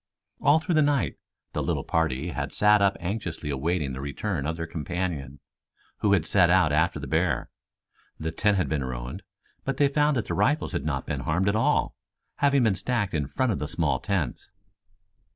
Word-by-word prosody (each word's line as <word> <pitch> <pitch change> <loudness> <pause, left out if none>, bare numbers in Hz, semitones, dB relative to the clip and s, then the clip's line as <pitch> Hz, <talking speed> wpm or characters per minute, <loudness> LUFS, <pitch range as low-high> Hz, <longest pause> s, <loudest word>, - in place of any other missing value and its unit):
All 145 - +5
through 165 +3 -1
the 155 - +4
night 145 -2 +1 0.4
the - - -1
little - - -1
party 80 -1 0
had - - -3
sat 105 0 +4
up 100 0 +3
anxiously 85 -5 -4
awaiting 75 0 -1
the 65 - -5
return 70 +2 -3
of 80 +1 -2
their 80 - -3
companion, 80 -3 -4 0.6
who 100 - +2
had 90 -5 +2
set 90 -2 +4
out 90 -3 +4
after 80 +2 +2
the 70 - -6
bear. 80 +6 0 0.7
The 80 +1 -2
tent 105 +2 +2
had 90 -6 +1
been 70 -1 -1
ruined, 65 +7 -5 0.4
but 135 -1 -2
they 145 - +4
found 145 0 +2
that 115 - -1
the - - -3
rifles 150 +3 +1
had 85 - -3
not 70 -3 -2
been 70 - -3
harmed 85 +9 +1
at 100 - +1
all, 110 - +1 0.4
having 140 -2 +3
been 110 -4 +3
stacked 105 0 -1
in 75 -4 -1
front 130 - 0
of 100 - -2
the 75 - -3
small - - 0
tents. 90 -10 -2
90 Hz, 195 wpm, -26 LUFS, 75-105 Hz, 0.7 s, All